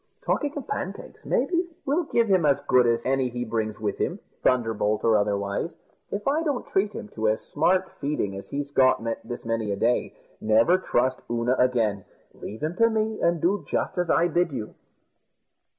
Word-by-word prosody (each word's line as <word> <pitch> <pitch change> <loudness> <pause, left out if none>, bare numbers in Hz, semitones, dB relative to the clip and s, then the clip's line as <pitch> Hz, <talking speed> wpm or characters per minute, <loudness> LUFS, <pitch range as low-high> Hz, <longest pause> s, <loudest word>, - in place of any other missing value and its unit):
Talking 290 -1 0
of 285 - -6
pancakes, 425 - -5
maybe, 350 0 +1 0.2
we'll 310 +5 +1
give 235 -5 +2
him 190 -4 +3
as 140 -2 +3
good 125 -1 +4
as 115 0 +1
any 130 -1 +1
he 120 0 -4
brings 110 -1 -2
with 105 -2 -2
him - - -1 0.2
thunderbolt 110 -4 +1
or 115 -1 +4
otherwise. 100 -1 -1 0.3
If 205 +3 -4
I 295 +4 +2
don't 290 -6 -1
treat 200 +2 0
him 210 - -7
to 110 - -2
as 110 - 0
smart 185 +1 +1
feeding 140 -9 -2
as 100 0 -8
he's 145 0 -4
got 130 -4 +4 0.2
this 120 +1 -7
many 115 -2 -1
a - - 0
day, 115 +5 0 0.3
never 115 +12 +4
trust 130 -7 0
Oonagh 120 +2 0
again. 115 -6 +2 0.3
Leave 110 +7 -8
him 160 +3 -1
to 230 0 +5
me, 220 -1 -1
and 170 0 +2
do 190 +6 +1
just - - -1
as 175 -1 0
I 170 +2 +4
bid 175 0 +1
you." 115 -6 -5
130 Hz, 185 wpm, -25 LUFS, 110-185 Hz, 0.3 s, to